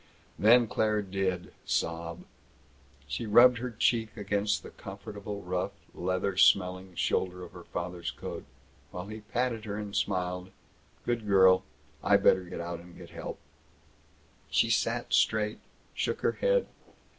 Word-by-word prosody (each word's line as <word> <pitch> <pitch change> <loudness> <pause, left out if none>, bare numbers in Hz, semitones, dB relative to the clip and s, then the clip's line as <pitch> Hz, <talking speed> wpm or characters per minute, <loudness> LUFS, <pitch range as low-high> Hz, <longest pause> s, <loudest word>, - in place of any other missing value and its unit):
Then 120 +3 +6
Claire 105 -1 +1
did 95 -2 -2
sob. 85 +1 -2 0.8
She 75 +10 -3
rubbed 120 +3 +7
her 125 +1 -3
cheek 115 0 0
against 105 0 0
the - - -10
comfortable, 100 +1 -8
rough, 90 0 -2 0.2
heather 95 +1 -1
smelling 95 -1 +3
shoulder 90 0 0
of 90 - -10
her 90 -1 -12
father's 90 -1 -4
coat, - - -6 0.5
while 90 +1 -6
he 110 +2 -7
patted 115 +1 -2
her 105 -1 -4
and 105 -1 -5
smiled, 90 -1 -1 0.6
"Good 120 -3 -1
girl! 95 -2 +6 0.4
I - - +5
better 95 -1 +4
get 90 - -7
out 85 0 -5
and 85 0 -14
help." - - -6 1.1
She - - +3
sat - - 0
straight, 105 -1 +2 0.3
shook - - -2
her - - +3
head. - - +2
100 Hz, 135 wpm, -29 LUFS, 90-110 Hz, 1.1 s, rubbed